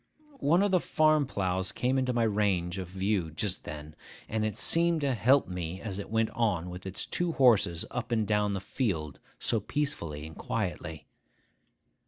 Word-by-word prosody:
One 170 +3 +3
of 205 - +1
the 185 - +4
farm 155 -3 +3
ploughs 95 -5 -1
came 130 +2 0
into 130 -1 0
my 120 -1 +1
range 100 -4 0
of 95 - -5
view 95 -1 -1
just 90 +5 -2
then; 75 0 -8 0.3
and 110 0 -1
it 110 -1 -2
seemed 170 -1 +4
to 140 -2 +1
help 130 +5 +3
me 90 0 -5
as 100 -2 -5
it 100 - -6
went 110 0 +1
on 95 -7 0
with 90 +2 -8
its 95 - -4
two 175 -1 -1
horses 110 - +4
up 120 0 -4
and 110 -2 +2
down 105 -1 +1
the 95 - -3
field 90 - -2 0.2
so 115 - +1
peacefully 90 - -3
and 80 0 -10
quietly. 75 -2 -4
105 Hz, 180 wpm, -29 LUFS, 90-125 Hz, 0.3 s, the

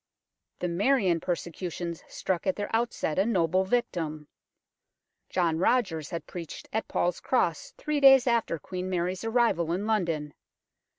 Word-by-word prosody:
The 180 - -2
Marian 190 -1 +2
persecutions 170 -1 -4
struck 185 -1 -3
at 190 - +2
their 205 +2 -2
outset 225 -8 -1
a 195 - +3
noble 185 -3 +2
victim. 170 -10 -2 1.0
John 165 -3 +1
Rogers 180 - +1
had 170 - -5
preached 170 -3 -8
at 220 - -1
Paul's 175 0 0
Cross 175 -11 0
three 300 -1 -1
days 270 -2 +8
after 235 -8 +1
Queen 185 +4 -5
Mary's 180 +1 -1
arrival 225 -8 +2
in 185 +4 -1
London. 170 -9 -1
180 Hz, 135 wpm, -28 LUFS, 170-225 Hz, 1.0 s, days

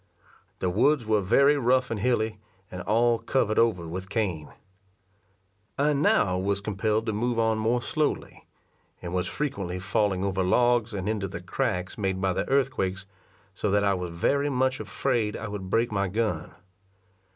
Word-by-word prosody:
The 90 - -1
woods 125 +6 +2
were 110 -1 +2
very 140 +10 +4
rough 130 -1 +2
and 110 - -2
hilly, 110 -2 0 0.3
and 90 - -6
all 115 +3 +2
covered 110 -5 +1
over 105 -8 +2
with 95 +3 -6
cane. 95 -9 -2 1.3
I 145 +2 +2
now 100 -10 +2
was 100 +1 0
compel'd 105 +2 -1
to 110 - -1
move 120 +3 -1
on 110 -1 +2
more 120 +2 +1
slowly; 155 +1 -2 0.5
and 85 0 -6
was 90 -1 0
frequently 100 -12 -3
falling 95 +1 0
over 95 -1 0
logs, 120 +4 +2
and 100 -2 -4
into 105 -3 -1
the 90 -2 -6
cracks 90 +2 -2
made 95 -2 -1
by 95 -1 +1
the - - -2
earthquakes, 125 -9 0 0.5
so 105 - -2
that 100 +1 +2
I 100 -1 +3
was 90 -2 -3
very 140 +10 +1
much 130 0 0
afraid 115 -6 -1
I 105 - -5
would 100 -3 -6
break 115 +3 +1
my 100 -1 0
gun. 95 -5 -2
105 Hz, 165 wpm, -26 LUFS, 95-120 Hz, 1.3 s, very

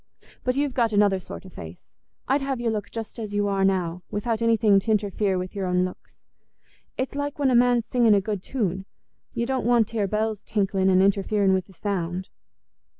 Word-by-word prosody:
But 250 0 0
you've 285 -1 0
got 230 -3 +1
another 205 -2 +3
sort 185 - -9
o' - - -10
face; 85 - -11 0.4
I'd 275 +2 +2
have 270 -2 -2
you 230 -2 0
just 225 +1 -7
as 210 -2 -5
you 205 0 +1
are 195 -1 +1
now, 180 -2 0
without 225 +2 -2
anything 225 -3 +4
t' 220 +3 -2
interfere 205 -2 +1
with 180 0 -4
your 195 -2 -3
own 180 0 +2
looks. 185 - -10 0.7
It's 260 - -2
like 285 0 -3
when 280 -3 +2
a - - +3
man's 240 -1 +4
singing 235 -4 +4
a - - +4
good 205 -1 -3
tune—you 200 +2 -5
don't 265 +1 -1
want 235 -2 +3
t' 230 - -5
hear 205 -2 +1
bells 215 +1 -1
tinkling 195 -2 0
and 185 0 +5
interfering 200 0 +2
wi' 190 - +3
the 190 +1 -13
sound." 185 -2 -3
210 Hz, 200 wpm, -25 LUFS, 190-235 Hz, 0.7 s, and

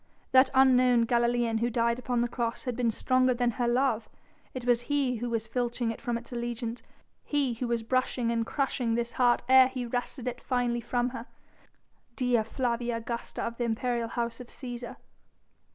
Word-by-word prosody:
That 260 0 +6
unknown 255 -2 +5
Galilean 235 -1 +1
who 235 +1 +1
died 235 0 +1
upon 245 -1 -1
the 240 - +1
cross 235 -1 -3
had 250 -3 -3
been 245 -1 +1
stronger 255 +2 +2
than 240 0 +1
her 240 +1 -1
love. 240 -2 +1 0.4
It 255 -2 -6
was 245 -1 +3
he 275 -4 +1
who 240 +2 -3
was 225 -1 -1
filching 240 0 -1
it 225 - -9
from 240 -3 -1
its 235 +2 -10
allegiance, 235 0 -4 0.4
he 280 -4 0
who 240 +2 -3
was 235 -1 -1
brushing 255 0 0
and 230 -1 +1
crushing 250 -2 -1
this 235 0 -2
heart 245 -1 +3
ere 260 0 +7
he 255 -1 -4
wrested 245 +1 -3
it 245 -1 -4
finally 245 -2 0
from 245 +1 0
her 245 -1 -8 0.9
Dea 245 -3 +2
Flavia 235 +1 -1
Augusta 235 +1 -5
of 230 0 -4
the 245 - -1
imperial 235 +1 -1
House 235 0 -3
of 250 - -9
Cæsar! 245 -1 -7
240 Hz, 185 wpm, -29 LUFS, 235-255 Hz, 0.9 s, ere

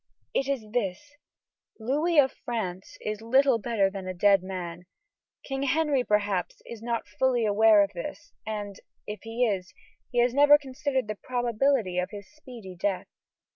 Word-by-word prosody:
"It 270 - 0
is 275 -6 -2
this: 230 +4 -2 0.7
Louis 300 +9 0
of 265 -2 +6
France 190 -6 -4
is 215 0 -4
little 260 +1 +3
better 215 -3 +1
than 190 -1 -6
a 185 - -4
dead 195 +1 +4
man. 180 -2 -6 0.6
King 270 -1 -3
Henry, 280 -1 +2
perhaps, 205 -5 0
is 235 -2 -9
not 235 0 -2
fully 250 -3 +3
aware 210 0 +6
of 200 0 -4
this, 170 -1 -7
and, 205 -2 -5 0.3
if 210 -1 -6
he 225 +2 0
is, 190 -4 -2 0.3
he 245 - -6
has 240 0 +3
never 290 +2 +7
considered 265 -2 -2
the 215 -1 -5
probability 240 -5 +1
of 180 +1 -2
his 205 -2 -9
speedy 240 -11 -11
death. 190 +1 -1
225 Hz, 160 wpm, -27 LUFS, 200-260 Hz, 0.7 s, never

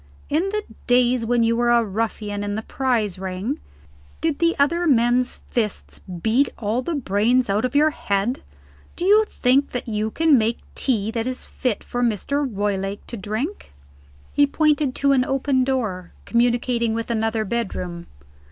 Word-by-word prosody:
"In 330 +7 +1
the 425 +1 -2 0.2
days 245 -1 +3
when 240 0 +3
you 230 0 +2
were 240 0 +2
a 235 -1 +4
ruffian 210 -1 -3
in 205 0 -2
the 220 - -3
prize 225 -9 -1
ring, 190 +9 -3 0.6
did 320 -3 -1
the 335 0 +3
other 335 +5 +2
men's 245 -2 +2
fists 220 -4 -2 0.2
beat 245 +5 +3
all 225 +3 -1
the 330 +6 -3
brains 240 -1 +2
out 210 +4 +1
of 255 - -3
your 305 +2 +5
head? 210 -1 -1 0.5
Do 350 - -3
you 425 +3 +6
think 265 +3 +2 0.2
you 215 -2 -1
can 310 +1 +4
make 225 +2 0 0.2
tea 220 -5 0
that 230 +1 -2
is 255 0 -5
fit 250 -5 -2
for 245 - -3
Mr. 245 +5 0
Roylake 200 -1 -2
to - - -7
drink?" 220 - -4 0.6
He 290 0 +4
pointed 295 -2 +1
to 280 0 +2
an 260 -2 +4
open 270 0 +1
door, 220 -9 -2
communicating 235 -1 +1
with 230 +1 -3
another 225 -1 0
bedroom. 185 -6 -3
240 Hz, 160 wpm, -22 LUFS, 215-270 Hz, 0.6 s, you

